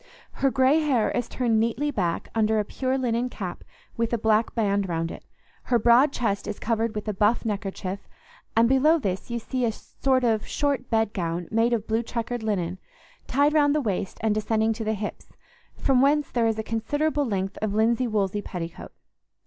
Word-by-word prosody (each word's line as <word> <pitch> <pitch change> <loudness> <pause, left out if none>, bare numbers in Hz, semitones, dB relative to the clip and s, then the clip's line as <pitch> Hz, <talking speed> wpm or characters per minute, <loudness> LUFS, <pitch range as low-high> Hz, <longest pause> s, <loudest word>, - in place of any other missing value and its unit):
Her 275 - +1
grey 265 +4 +3
hair 275 -8 +1
is 245 -1 -2
turned 235 -3 +1
neatly 235 +6 0
back 180 -9 -2
under 220 -1 +2
a 210 - +1
pure 260 +4 -1
linen 245 -1 0
cap 185 -7 -6 0.3
with 230 -1 0
a - - +3
black 220 0 +1
band 200 -4 +1
round 165 0 -2
it; - - -9 0.4
her 245 - +3
broad 240 +5 +5
chest 210 -7 -1
is - - -4
covered 225 0 -1
with 210 +1 -4
a 215 - 0
buff 210 +5 +2
neckerchief, 200 -2 -4 0.5
and 230 +1 +5
below 275 +6 +4
this 195 - -3
you 235 - -2
see 250 +2 -3
a 230 - +2
sort 260 +3 -1
of 225 -3 +2
short 280 -4 -1
bedgown 180 -7 -1
made 225 +2 +2
of 225 -3 0
blue 225 +1 0
checkered 235 +1 -4
linen, 190 -4 -2 0.5
tied 285 +3 +3
round 290 -1 +4
the - - +3
waist 200 -7 -2
and 220 -1 +3
descending 220 +1 +1
to 225 +1 -5
the 220 0 0
hips, 205 0 -6 0.5
from 260 -2 +3
whence 290 +1 +2
there 235 -2 +2
is 220 -1 0
a 220 - -2
considerable 290 +8 0
length 195 -6 -2
of 210 -1 -1
linsey 235 +3 +2
woolsey 205 -2 0
petticoat. 170 -4 -7
225 Hz, 190 wpm, -25 LUFS, 210-250 Hz, 0.5 s, broad